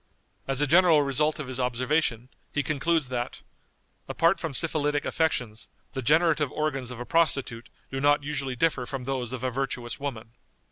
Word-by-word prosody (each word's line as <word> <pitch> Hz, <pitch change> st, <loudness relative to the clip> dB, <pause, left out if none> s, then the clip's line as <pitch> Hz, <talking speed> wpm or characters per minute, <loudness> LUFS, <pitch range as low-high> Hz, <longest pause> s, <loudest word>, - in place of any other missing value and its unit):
As 135 Hz, 0 st, -1 dB
a -, -, +4 dB
general 165 Hz, -1 st, +5 dB
result 150 Hz, +3 st, +1 dB
of 150 Hz, -, -5 dB
his 130 Hz, 0 st, -4 dB
observations, 125 Hz, 0 st, 0 dB, 0.2 s
he 145 Hz, -, 0 dB
concludes 155 Hz, -1 st, 0 dB
that, 120 Hz, -1 st, -4 dB, 0.6 s
"apart 170 Hz, +3 st, +2 dB
from 160 Hz, -4 st, -3 dB
syphilitic 145 Hz, -1 st, +1 dB
affections, 125 Hz, -9 st, -1 dB, 0.3 s
the 130 Hz, -, -3 dB
generative 155 Hz, +1 st, +3 dB
organs 140 Hz, -5 st, -2 dB
of 125 Hz, -2 st, -7 dB
a 125 Hz, -, -5 dB
prostitute 135 Hz, -8 st, 0 dB, 0.2 s
do 135 Hz, 0 st, -3 dB
not 145 Hz, +1 st, +4 dB
usually 140 Hz, -3 st, -3 dB
differ 125 Hz, -2 st, +1 dB
from 135 Hz, -3 st, -5 dB
those 125 Hz, -2 st, -3 dB
of 130 Hz, -1 st, -5 dB
a 130 Hz, -, 0 dB
virtuous 125 Hz, -2 st, -3 dB
woman." 120 Hz, -6 st, -5 dB
135 Hz, 170 wpm, -27 LUFS, 125-155 Hz, 0.6 s, general